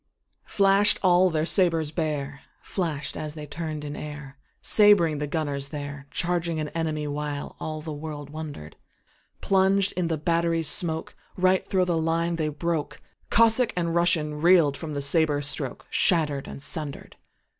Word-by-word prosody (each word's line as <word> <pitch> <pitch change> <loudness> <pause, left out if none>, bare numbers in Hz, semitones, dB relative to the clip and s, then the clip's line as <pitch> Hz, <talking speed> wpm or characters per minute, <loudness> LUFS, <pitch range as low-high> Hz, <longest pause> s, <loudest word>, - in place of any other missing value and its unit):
Flash'd 200 +1 +3
all 185 0 +5
their 155 -2 0
sabres 165 -5 +2
bare, 145 -4 -3 0.2
Flash'd 160 -6 -3
as 155 0 -5
they 150 -1 -7
turn'd 155 0 -5
in 145 - -5
airSabring 150 +5 +2
the 150 - -2
gunners 145 -3 -2
there, 145 -1 -7
Charging 170 -2 -1
an 150 -1 -4
army, 155 -2 -2
whileAll 150 +1 -5
the 155 -1 -5
world 145 -1 -7
wonder'd:Plunged 185 - -2
in 180 -2 -2
the 165 -1 -1
battery 165 +1 0
smokeRight 180 +3 0
thro' 185 -1 +1
the 170 -2 0
line 165 +1 0
they 155 -2 -1
broke; 160 +1 -3 0.3
Cossack 230 +2 +4
and 170 -1 0
RussianReel'd 165 -2 +3
from 150 +1 -6
the 140 - -2
sabre 150 0 +3
strokeShatter'd 145 +1 -1
and 140 - -7
sunder'd. 145 0 -3
160 Hz, 135 wpm, -25 LUFS, 145-170 Hz, 0.3 s, all